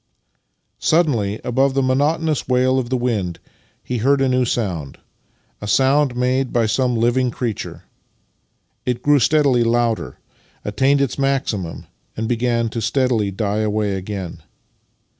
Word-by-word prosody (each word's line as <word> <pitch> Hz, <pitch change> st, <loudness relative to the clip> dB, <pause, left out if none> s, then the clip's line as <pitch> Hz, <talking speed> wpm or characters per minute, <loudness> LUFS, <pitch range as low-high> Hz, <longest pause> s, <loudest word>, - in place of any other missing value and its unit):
Suddenly, 120 Hz, -11 st, +1 dB
above 130 Hz, +2 st, +1 dB
the 135 Hz, -, +2 dB
monotonous 150 Hz, +4 st, +1 dB
wail 130 Hz, +1 st, +2 dB
of 120 Hz, -2 st, -4 dB
the 130 Hz, -, +1 dB
wind 105 Hz, -9 st, -1 dB, 0.5 s
he 125 Hz, -1 st, -3 dB
heard 140 Hz, +5 st, +3 dB
a 135 Hz, -, +2 dB
new 125 Hz, 0 st, +2 dB
sound 90 Hz, -, -3 dB, 0.3 s
— -, -, -41 dB
a 105 Hz, -, -5 dB
sound 135 Hz, +2 st, +3 dB
made 125 Hz, +1 st, 0 dB
by 120 Hz, -2 st, +2 dB
some 125 Hz, +3 st, +1 dB
living 120 Hz, +2 st, +2 dB
creature. 115 Hz, -2 st, -4 dB, 1.0 s
It 125 Hz, -1 st, -2 dB
grew 145 Hz, -1 st, +4 dB
steadily 140 Hz, -3 st, +3 dB
louder, 115 Hz, -1 st, 0 dB, 0.5 s
attained 135 Hz, +7 st, +2 dB
its 140 Hz, 0 st, -1 dB
maximum, 130 Hz, -11 st, -1 dB, 0.3 s
and 110 Hz, +1 st, -2 dB
began 120 Hz, 0 st, 0 dB
as 115 Hz, -, -2 dB
steadily 120 Hz, -3 st, +1 dB
to 95 Hz, -, -10 dB
die 105 Hz, -1 st, 0 dB
away 105 Hz, -1 st, 0 dB
again. 95 Hz, -2 st, -5 dB
125 Hz, 140 wpm, -20 LUFS, 110-135 Hz, 1.0 s, grew